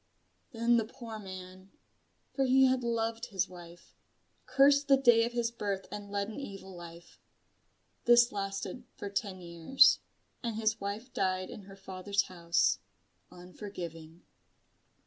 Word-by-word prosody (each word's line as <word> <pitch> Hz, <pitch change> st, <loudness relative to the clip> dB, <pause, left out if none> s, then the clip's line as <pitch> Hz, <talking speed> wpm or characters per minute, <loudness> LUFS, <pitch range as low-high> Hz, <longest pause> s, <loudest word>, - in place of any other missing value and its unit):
Then 235 Hz, -1 st, +3 dB
the 225 Hz, -, +1 dB
poor 225 Hz, -1 st, -9 dB
man 185 Hz, -1 st, -10 dB, 0.6 s
for 270 Hz, -, +1 dB
he 265 Hz, +1 st, +5 dB
had 255 Hz, -1 st, +2 dB
loved 230 Hz, 0 st, -1 dB
his 195 Hz, -6 st, -1 dB
wife 175 Hz, -1 st, -13 dB, 0.5 s
cursed 280 Hz, +1 st, +5 dB
the 275 Hz, -1 st, +6 dB
day 240 Hz, -4 st, +5 dB
of 240 Hz, -, -4 dB
his 235 Hz, -1 st, 0 dB
birth 200 Hz, -4 st, -3 dB
and 205 Hz, -1 st, -7 dB
led 200 Hz, 0 st, -1 dB
an 220 Hz, +6 st, -7 dB
evil 195 Hz, -7 st, -8 dB
life. 170 Hz, 0 st, -12 dB, 0.9 s
This 240 Hz, 0 st, +6 dB
lasted 195 Hz, +5 st, -4 dB
for 200 Hz, -, -6 dB
ten 195 Hz, -2 st, -3 dB
years, 170 Hz, +11 st, +4 dB, 0.4 s
and 235 Hz, -3 st, -3 dB
his 220 Hz, 0 st, 0 dB
wife 205 Hz, +6 st, -5 dB
died 185 Hz, -1 st, -1 dB
in 200 Hz, -, -9 dB
her 195 Hz, 0 st, -12 dB
father's 190 Hz, +1 st, -1 dB
house, 170 Hz, -2 st, +1 dB, 0.5 s
unforgiving. 175 Hz, -3 st, -9 dB
205 Hz, 140 wpm, -31 LUFS, 185-235 Hz, 0.9 s, the